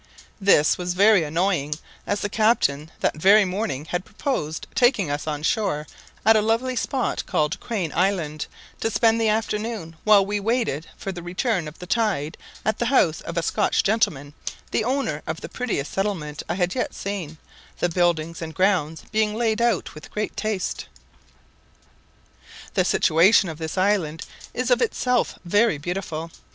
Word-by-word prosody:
This 190 -7 +4
was 180 0 -2
very 200 -1 +5
annoying; 155 -2 0 0.3
as 205 - -1
the - - 0
captain, 200 -9 +2
that - - +1
very 200 +3 +7
morning, 185 -6 -3
had 175 +2 -2
proposed 160 - -3
taking 235 - +3
us 145 +2 -3
on 150 -1 -3
shore 160 -5 0 0.4
at 220 +1 +7
a 215 - +4
lovely 230 +4 0
spot 255 +2 -1
called 150 +5 0
Crane 195 -9 -3
Island, 170 -5 0 0.3
to 225 - 0
spend 225 +1 +3
the 220 - +3
afternoon, 215 -5 -2
while 210 -2 +6
we 205 +1 -1
waited 220 - -1
for 195 - -4
the 175 -2 -7
return 180 +1 -1
of 150 - -10
the 180 - -8
tide, 185 -7 0 0.3
at 215 - 0
the 240 - +1
house 175 - +3
of 170 - -6
a 170 - +1
Scotch - - +1
gentleman, 150 -10 0 0.4
the - - +1
owner 245 - -1
of 160 +1 -4
the - - -6
prettiest 230 - -3
settlement 175 -7 -2
I 175 - 0
had 180 -1 0
yet 250 - -2
seen, 185 -6 -5 0.4
the - - +1
buildings 170 -2 0
and 160 -1 -6
grounds 180 -5 +1
being 215 0 +1
laid 225 -1 0
out 235 -5 +1
with 155 - -11
great 210 0 -3
taste. 215 -4 -2 1.9
The - - +2
situation 175 +4 +4
of 160 -1 -7
this 160 +2 -4
island 185 -5 +1 0.3
is 250 0 -2
of 245 - +4
itself 250 - +1
very 205 +1 +3
beautiful. 165 0 -4
190 Hz, 165 wpm, -24 LUFS, 160-220 Hz, 1.9 s, very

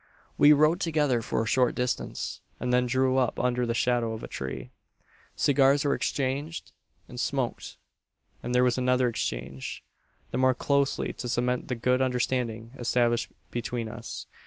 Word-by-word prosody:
"We 145 - +7
rode 155 +4 +5
together 150 -9 +1
for 115 - -1
a - - -4
short 125 +1 +2
distance; 125 0 -3 0.2
and 125 0 -1
then 125 0 +3
drew 130 +1 +2
up 125 -3 0
under 125 -1 +1
the 115 - -1
shadow 120 -2 +1
of 110 - -7
a - - -5
tree. 65 -1 -6 0.6
"Cigars 140 +1 +3
were 140 - +3
exchanged, 135 +6 -2 0.4
and - - -9
smoked; - - -2 0.6
and 125 +1 -3
there 125 - +5
was 125 0 +2
another 125 0 +2
exchange 65 - -4 0.5
the 125 - -1
more 130 -1 +4
closely 140 +1 0
to 125 - -6
cement 125 +1 0
the 125 - -2
good 125 +2 +1
understanding 125 -3 -1
established 120 -1 +1 0.2
between 120 -1 -3
us. 115 +1 -7
125 Hz, 160 wpm, -27 LUFS, 120-130 Hz, 0.6 s, We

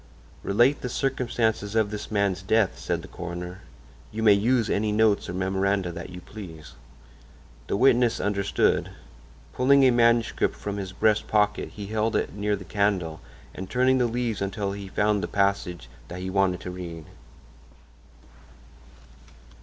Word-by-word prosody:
"Relate 120 +8 +3
the 125 - -3
circumstances 115 -5 -1
of 110 -2 +2
this 105 0 -6
man's 100 -3 0
death," 105 0 +1
said - - -2
the - - -9
coroner. 90 +2 -7 0.5
"You 110 +1 -3
may 105 -2 +7
use 115 +3 +2
any 105 +1 0
notes 105 -2 +2
or - - -4
memoranda 95 0 0
that 85 +1 -7
you 90 0 -9
please." 85 -8 -10 0.9
The - - -1
witness 120 -1 +4
understood. 100 -1 +1 0.6
Pulling 140 +2 +4
a 130 - +6
manuscript 115 -1 +2
from 100 0 -5
his 95 -2 -5
breast 105 +2 +1
pocket 105 -1 +1
he 105 - -6
held 110 +2 -1
it - - -1
near 105 +1 0
the 95 -2 -9
candle 95 -6 -1 0.3
and 95 0 -7
turning 130 +1 +3
the 125 - +3
leaves 115 -3 -2
until 100 0 -2
he 100 0 -6
found 105 +1 +1
the - - -2
passage 100 -7 -1 0.2
that 90 - -7
he 95 0 -4
wanted 95 -2 +1
began 90 - -6
to - - -8
read. 85 -3 -7
100 Hz, 155 wpm, -25 LUFS, 95-110 Hz, 0.9 s, may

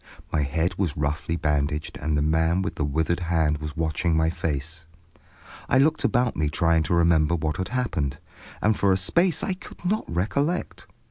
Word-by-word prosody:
My 80 - +2
head 80 +6 -1
was 85 -7 -1
roughly 75 +3 -1
bandaged, 75 -1 -1
and 75 0 -1
the 75 - +1
man 80 +4 +2
with - - -3
the - - -3
withered 80 +4 0
hand 80 -3 +1
was 75 -1 -6
watching 80 +1 0
my 80 0 +2
face. 80 -1 -3 0.8
I 130 - +4
looked 155 +4 +3
about 120 0 +2
me 75 -1 0
trying 80 +2 +2
to 85 - +1
remember 85 -1 +3
what 80 -2 -2
had 95 - -2
happened, 85 - -2 0.5
and 105 0 +3
for 100 -1 +2
a 95 - +4
space 170 - +2
I 190 - 0
could 185 - -13
not 210 +4 0
recollect. 140 - -1
80 Hz, 185 wpm, -25 LUFS, 75-95 Hz, 0.8 s, I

